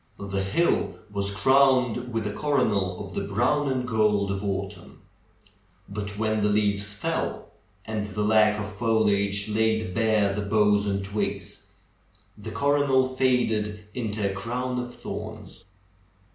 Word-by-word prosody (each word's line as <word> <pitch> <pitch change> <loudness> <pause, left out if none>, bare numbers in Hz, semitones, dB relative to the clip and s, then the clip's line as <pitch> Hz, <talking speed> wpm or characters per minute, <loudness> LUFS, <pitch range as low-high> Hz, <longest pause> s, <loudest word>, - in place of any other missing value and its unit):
The 100 -1 -3
hill 135 - +1 0.2
was 100 0 0
crowned 125 +2 +3
with 115 -1 -2
a 105 - -2
coronal 105 -10 0
of 95 - -11
the - - -2
brown 120 +9 +1
and 125 -1 -2
gold 105 -3 +2
of 100 +1 -3
autumn. 100 0 -5 0.9
But 100 0 -6
when 110 0 0
the 105 - +2
leaves 100 -1 +1
fell 100 -1 -3 0.3
and 110 -1 -3
the 105 +1 -3
lack 105 0 +4
of 105 - -3
foliage 105 -2 +1
laid 110 -3 0
bare 110 -2 +2
the 105 - -2
boughs 105 0 +2
and 100 -1 -1
twigs, 100 -2 -4 0.7
the - - -8
coro 145 0 +1
nal 130 -1 +3
faded 110 -5 0
into 110 -4 -1
a 100 - -2
crown 125 +5 -3
of 125 0 -5
thorns. 105 -3 -8
105 Hz, 145 wpm, -26 LUFS, 100-115 Hz, 0.9 s, lack